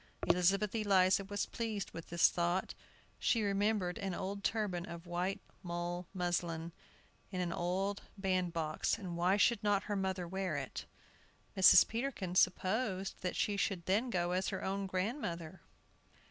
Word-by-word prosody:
Elizabeth 190 +4 +3
Eliza 195 -3 +3
was 205 +1 -2
pleased 220 -4 -4
with 165 - -9
this 170 0 +5
thought. 175 +2 0 0.5
She 230 -3 +2
remembered 200 -2 0
an 195 -3 -2
old 200 +1 -4
turban 205 -7 0
of 170 0 -8
white 180 +3 -2 0.2
mull 175 0 -4
muslin, 175 -2 -2 0.6
in 185 - -4
an 175 -2 -1
old 190 +4 -1 0.2
bandbox, 175 -5 0
and 180 -5 -6
why 180 +3 +3
should 220 0 +3
not 205 -1 +2
her 205 - -2
mother 190 -2 -1
wear 185 -3 -2
it? 135 -2 -5 0.7
Mrs. 190 -1 +8
Peterkin 230 -6 -3
supposed 190 +2 +1
that 180 - -2
she 205 - +1
should 195 -4 -1
then 215 +7 +1
go 175 -5 0
as 185 +1 0
her 190 - -3
own 195 +1 -2
grandmother. 185 - -3
185 Hz, 145 wpm, -34 LUFS, 175-200 Hz, 0.7 s, Mrs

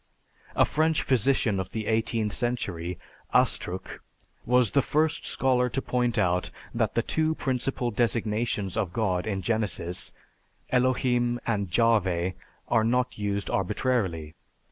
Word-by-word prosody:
"A - - +5
French 160 +1 +1
physician 125 -5 +2
of 95 0 -5
the 110 -1 -3
eighteenth 110 -1 0
century, 100 -9 -2 0.4
Astruc, 95 +2 +1 0.5
was 125 -3 +4
the 140 - +4
first 155 +4 0
scholar 125 -1 +2
to 135 - -2
point 125 -3 0
out 90 0 +1 0.2
that - - 0
the - - +2
two 160 0 0
principal 130 -3 -1
designations 110 -3 0
of 100 -6 -1
God 95 -3 0
in 95 -3 -2
Genesis, 95 -5 -2 0.6
Elohim 125 -1 +2
and 100 -5 -1
Jahveh, 95 -4 +2 0.3
are 115 -2 +3
not 125 +1 0
used 100 -1 -2
arbitrarily. 95 -6 -1
115 Hz, 125 wpm, -27 LUFS, 95-125 Hz, 0.6 s, A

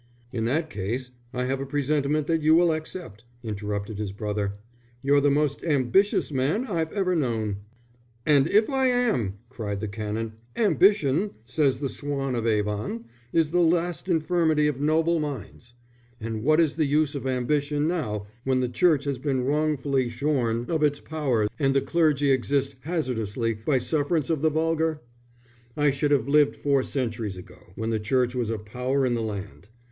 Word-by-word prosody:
"In 115 -2 -1
that 155 +6 0
case 120 +6 -3 0.2
I 125 - -2
have 135 +1 -1
a - - -3
presentiment 145 +1 0
that 165 0 +1
you 155 +1 +5
will 170 0 +5
accept," 155 - -6 0.2
interrupted 105 -1 -4
his 105 -2 -3
brother. 105 -1 -2 0.5
"You're 140 +1 +4
the 145 - +4
most 145 0 0
ambitious 155 - +2
man 145 - 0
I've 165 -8 -2
ever 185 -3 0
known." 110 -9 -1 0.7
"And 145 0 +4
if 215 +2 +4
I 265 -2 +1
am!" 230 - +1
cried 105 -5 -4
the 110 - -3
Canon. 110 +2 -4 0.2
"Ambition, 200 - +3
says 135 +1 +1
the 140 +1 -2
Swan 140 -1 -3
of 115 -1 -1
Avon, 105 +1 -1 0.3
is 160 -2 +2
the 175 - +2
last 170 +1 +1
infirmity 160 -2 +2
of 145 -2 -1
noble 160 +2 +2
minds. 125 -4 -6 0.4
But 115 0 -4
what 155 +8 +3
is 160 -3 +3
the 155 -1 +1
use 150 +1 +2
of 140 -2 -4
ambition 145 +3 0
now, 110 - -2 0.2
when 130 -1 +1
the 125 -1 0
Church 150 +2 +3
has 140 -3 -2
been 130 -2 -1
wrongfully 140 -2 0
shorn 120 -2 0
of 160 -2 -1
its 145 -1 +2
power, 135 -9 0
and 135 -2 +2
the - - +6
clergy 150 -4 +2
exist 135 +1 +1
hazardously 125 - -2
by 110 +6 0
sufferance 150 +4 0
of 155 -4 0
the 160 - +4
vulgar? 160 0 0 0.8
I 145 -1 +3
should 140 +2 0
have 140 -4 +2
lived 145 0 +4
four 140 -2 +1
centuries 115 -7 -3
ago, 90 0 -14
when 110 +1 -2
the 110 - 0
Church 125 +3 +1
was 120 -3 -1
a 115 - -1
power 125 +6 -1
in 125 - +1
the 115 - -1
land. 100 -2 -6
140 Hz, 170 wpm, -26 LUFS, 115-155 Hz, 0.8 s, the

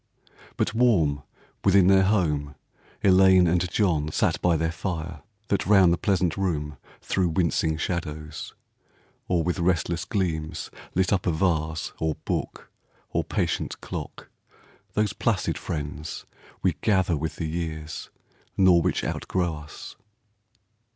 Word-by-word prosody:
But - - 0
warm 90 -12 +3 0.4
within 95 -1 +5
their 95 +1 +6
home 75 -8 +1 0.5
Elaine 95 -1 +6
and 90 +1 +1
John 85 -7 +1
Sat - - +1
by 85 -2 +3
their 80 +1 0
fire, 85 -3 -4 0.3
that 100 - 0
round 95 -4 +6
the - - 0
pleasant 90 -5 +1
room 75 -7 -2 0.2
Threw 95 -2 0
wincing 80 -2 +1
shadows, 75 -3 -4 0.7
or 85 -2 +1
with 90 +2 -1
restless 85 -1 +1
gleams 80 -6 -2 0.2
Lit 95 +2 +2
up 95 -1 0
a - - +3
vase 80 -2 0
or 80 -1 0
book - - -3 0.4
or - - 0
patient - - -2
clock, - - -7 0.6
Those 105 -1 +1
placid 110 -3 0
friends 75 0 -5 0.4
we 90 -2 +3
gather 95 -5 +2
with 80 +2 -3
the 85 - -3
years. 80 -1 -5 0.5
Nor 90 -3 +6
which - - 0
outgrow 90 -3 -1
us. 75 0 -10
85 Hz, 130 wpm, -25 LUFS, 80-95 Hz, 0.7 s, their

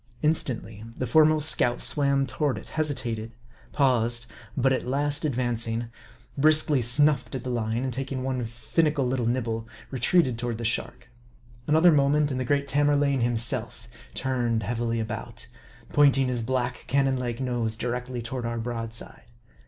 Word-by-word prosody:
Instantly 120 -8 0
the 130 - -2
foremost 155 +4 +4
scout 120 -5 +2
swam 140 -2 +2
toward 135 +3 -1
it; - - -10
hesi 155 -2 0
tated; 115 -3 -4 0.4
paused; 120 -4 +2 0.3
but 135 0 +3
at 130 - -2
last 145 +3 0
advancing, 120 -4 -1 0.5
briskly 150 -1 +4
snuffed 135 +3 +2
at 125 - -5
the 125 - -3
MARDL 115 -3 -1
71 - - -3
line, 120 - -1
and 130 -1 -2
taking 130 0 -4
one 130 -2 -2
finical 140 +5 0
little 125 -2 -1
nibble, 115 -2 -2 0.2
retreated 130 -1 +2
toward 120 -2 -3
the 115 - -5
shark. 120 +1 -3 0.6
Another 160 +3 +5
moment, 145 0 +2
and 130 - -2
the 130 - -2
great 140 +2 0
Tamerlane 145 -1 +2
himself 120 0 0 0.3
turned 120 -4 -1
heavily 115 +2 -2
about; 110 0 -6 0.5
pointing 140 -3 +4
his 120 -2 -1
black, 125 +1 -2
cannon 135 0 +2
like 120 -1 -3
nose 120 -4 -2
directly 125 +1 -4
toward 120 +2 -5
our 115 0 -3
broadside. 115 -1 -6
125 Hz, 155 wpm, -26 LUFS, 115-140 Hz, 0.6 s, Another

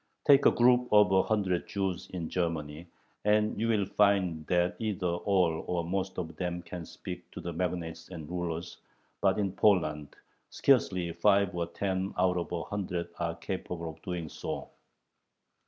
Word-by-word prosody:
Take 140 -1 +7
a - - +6
group 125 +1 +4
of 105 -2 +6
a 95 0 +5
hundred 95 -4 0
Jews 95 -3 -2
in 85 -3 -4
Germany, 80 -2 -3 0.4
and 105 0 +2
you 115 - +1
will 110 -3 +2
find 95 -6 +2
that 90 0 +2
either 105 -4 -2
all 90 -2 +1
or 90 -1 0
most 95 +2 -2
of 80 -3 -4
them 90 -1 -3
can 85 0 -7
speak - - -8
to - - -6
the 85 - -5
magnates 85 -2 -3
and 80 -5 -8
rulers, 85 0 -4 0.4
but 95 -1 +3
in 100 -2 0
Poland 75 -8 +2 0.3
scarcely 95 -10 +2
five 100 +1 +3
or 85 -1 -1
ten 95 +2 -2
out 90 0 +2
of 85 - -3
a 85 -1 -2
hundred 90 -4 -3
are 85 -1 -1
capable 90 -3 -5
of 80 - -17
doing 90 -4 -4
so. - - -6
90 Hz, 165 wpm, -30 LUFS, 85-100 Hz, 0.4 s, Take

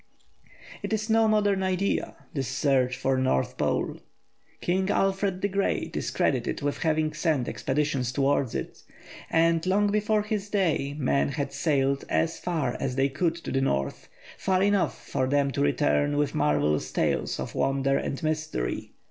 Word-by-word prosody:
It - - -3
is 215 +1 -1
no 225 0 +4
modern 205 -2 +2
idea, 190 +1 0 0.2
this 135 -4 -2
search 130 -2 +1
for 135 0 +1
the - - +1
North 65 - +1
Pole. - - -1 0.6
King 190 +2 0
Alfred 195 -1 +1
the - - +3
Great 200 0 -1
is - - -2
credited - - 0
with 145 0 -1
having 155 -1 +1
sent 155 -5 0
expeditions 135 -3 -1
towards 135 -2 +1
it, - - -5 0.5
and 165 0 +3
long 205 +2 +3
before 210 0 +1
his 210 -1 -3
day 160 -9 0
men 140 -1 +1
had 140 -1 -3
sailed 140 -2 +1
as 165 0 0
far 160 -8 -1
as 130 -2 -2
they 135 +1 +2
could 165 +4 0
to 170 - -7
the 135 - +1
North, 70 - -1 0.3
far 190 -1 +2
enough 200 -2 +2
for 130 - -1
them 140 0 +2
to 140 - -2
return 145 0 +2
with 145 -1 +1
marvellous 75 0 +1
tales - - 0
of - - -4
wonder 135 0 +1
and 135 - -2
mystery. 155 - -2
150 Hz, 165 wpm, -27 LUFS, 135-190 Hz, 0.6 s, no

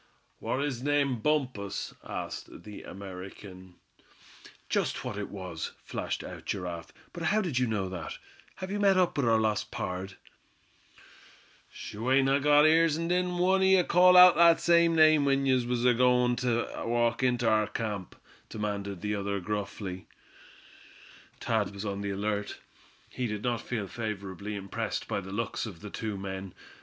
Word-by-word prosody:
"War 130 - -2
his 140 -4 -2
name 140 -3 +1
Bumpus?" 125 -8 -1
asked - - -7
the 105 +1 -9
American. 95 -1 -10 0.9
"Just - - -1
what - - -4
it 105 0 -5
was," 90 -5 -6
flashed - - -4
out - - -9
Giraffe; 90 -3 -4 0.2
"but 175 - -7
how 210 +5 +2
did 170 -11 -1
you 125 - +1
know 105 -4 -1
that? 85 -5 -6 0.4
Have 185 0 -6
you 205 - -2
met 195 -2 +4
up 180 -2 +2
with 140 -4 +1
our 115 - +4
lost 110 -1 0
pard?" 95 -5 -5 1.6
"Sho! 110 +4 -6
ain't 135 0 +4
I 135 +1 +3
got 145 +1 +5
ears, 160 0 +4
an' 165 +1 -2
didn't 180 0 0
one 190 +2 +3
o' - - +3
ye 190 -1 +5
call 180 +1 +6
out 180 -1 +10
that 170 0 +6
same 170 -1 +4
name 155 -2 +6
when 135 0 +2
ye 130 -2 +3
was 120 0 0
agoin' 125 0 +4
ter 120 -1 -2
walk 120 0 +1
inter 125 -2 +1
our 110 -1 +3
camp?" 105 -5 -4 0.3
demanded 100 -3 -4
the 105 0 -2
other, 100 -1 -2
gruffly. 100 -1 -5 1.3
Thad 105 -4 -1
was 100 +2 -6
on 100 -1 -3
the 100 - -3
alert. 100 +1 -2 0.5
He 125 -1 -3
did 105 -1 -4
not 120 -2 -1
feel 115 -5 -3
favorably 100 -1 -5
impressed 100 -1 -4
by 100 - -2
the 95 0 -9
looks 115 +2 -3
of 90 -6 -10
the 105 - -8
two 110 -3 -4
men. 95 -1 -6
115 Hz, 165 wpm, -29 LUFS, 100-145 Hz, 1.6 s, out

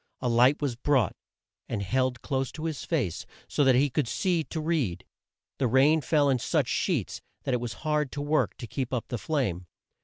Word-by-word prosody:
A 125 - -2
light 125 +5 +4
was 135 -5 0
brought, 130 0 +1 0.5
and 105 -4 -2
held 130 +3 0
close 135 -2 -1
to 160 - -6
his 160 -3 -3
face 130 - -1 0.2
so 145 - +1
that 130 -2 +5
he 140 +2 +3
could 140 -1 0
see 175 +5 0
to 160 - -5
read. 155 - -1 0.5
The 130 - +2
rain 140 +6 +4
fell 145 -1 +2
in 130 -2 +2
such - - +1
sheets - - -1 0.2
that 135 - -1
it 125 - 0
was 120 -3 -3
hard 150 -2 0
work 145 +2 0
to 120 - -6
keep 125 +3 -3
up 120 - -4
the 120 - -3
flame. 100 - -1
135 Hz, 195 wpm, -28 LUFS, 120-150 Hz, 0.5 s, that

